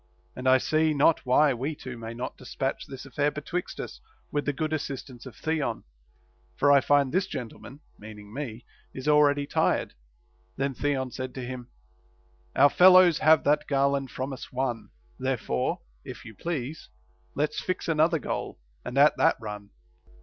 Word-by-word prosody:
And 130 +1 0
I 130 - +7
see 155 +3 +1
not 145 0 +3
why 140 +3 +5
we 135 +6 -3
two 130 -3 -8
may 115 0 -7
not 125 +2 -5
despatch 135 +2 -4
this 135 -1 -9
affair 145 +2 0
betwixt 150 +4 -5
us, - - -7 0.3
with 145 -1 -1
the - - +3
good 155 +2 -3
assist 140 -3 -4
ance 125 +1 -12
of 120 - -11
Theon; 155 -7 -2 0.7
for 145 - +4
I 140 -1 +6
find 140 -2 +3
this 185 +2 +1
gentleman 130 0 -8 0.2
(meaning 105 -1 -11
me) 120 -4 -6 0.3
is 130 +2 -6
already 145 -1 +4
tired. - - 0 0.6
Then 135 0 -1
Theon 130 -1 -1
said 130 0 -6
to 130 -2 -5
him, 125 -1 -7 0.9
Our 140 +1 +6
fellows 180 -2 +7
have 155 0 +5
that 150 +1 +2
garland 140 -1 +1
from 130 +3 -4
us 130 - -9
won; 125 -3 -2 0.3
therefore, 130 - -1 0.2
if - - -9
you 110 - -10
please, 150 - -5 0.5
Let's 150 +1 -1
fix 185 - -3
another 165 +1 +3
goal, 145 - -4 0.3
and 125 - -5
at 145 +2 +6
that 165 - +4
run. 105 -2 -7
140 Hz, 165 wpm, -27 LUFS, 125-150 Hz, 0.9 s, I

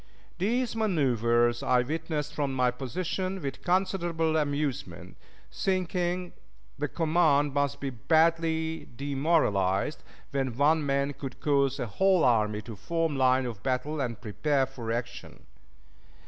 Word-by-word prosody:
These 235 +5 0
manoeuvers 120 - +2
I 125 -1 +3
witnessed 150 +1 -3
from 140 -3 -1
my 125 -1 +2
position 185 +8 -3
with 140 -5 -5
considerable 175 -3 +1
amusement, 145 -2 -2 0.4
thinking 180 -1 -1 0.5
the 145 - 0
command 155 -3 +2
must 140 -2 0
be 135 -1 -3
badly 160 +4 +1
demoralized 135 - +1 0.3
when 135 -4 -2
one 150 +2 +3
man 140 0 0
could 135 -2 -8
cause 140 -2 +2
a - - -1
whole 185 - +2
army 105 -3 +2
to 115 - -8
form 165 - -1
line 130 0 +3
of 115 -5 -6
battle 135 +4 -1
and 120 -3 -3
prepare 135 +5 0
for 120 -4 -6
action. 115 -8 -5
145 Hz, 125 wpm, -28 LUFS, 125-165 Hz, 0.5 s, I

